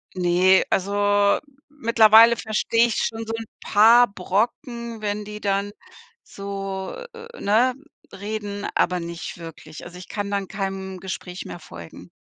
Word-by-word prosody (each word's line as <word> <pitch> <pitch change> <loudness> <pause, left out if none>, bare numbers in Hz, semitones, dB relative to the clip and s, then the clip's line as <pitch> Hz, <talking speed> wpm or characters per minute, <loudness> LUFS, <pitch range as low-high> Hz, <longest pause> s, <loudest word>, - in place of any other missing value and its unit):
Ne, 180 +1 +4
also 205 +1 +2 0.3
mittlerweile 230 -4 +6
verstehe 230 +1 +1
ich 230 - -3
schon 225 0 -2
so 225 - -4
'n 225 -1 -5 0.2
paar 230 +4 +6
Brocken, 230 +4 -2
wenn 210 0 -3
die 210 0 -8
dann 200 0 -1 0.5
so, 195 -1 -6 0.2
äh, - - -11
äh, 470 +1 -12
ne, 235 +5 +3 0.4
reden, 205 0 -5
aber 180 -1 +1
nicht 170 0 -7
wirklich. 160 -2 -10
Also, 175 +1 -11
ich 180 - -11
kann 205 -1 -4
dann 200 -2 -2
keinem 190 -2 -5
Gespräch 185 -1 -7
mehr - - -8
folgen. 85 - -12
205 Hz, 140 wpm, -23 LUFS, 190-225 Hz, 0.5 s, mittlerweile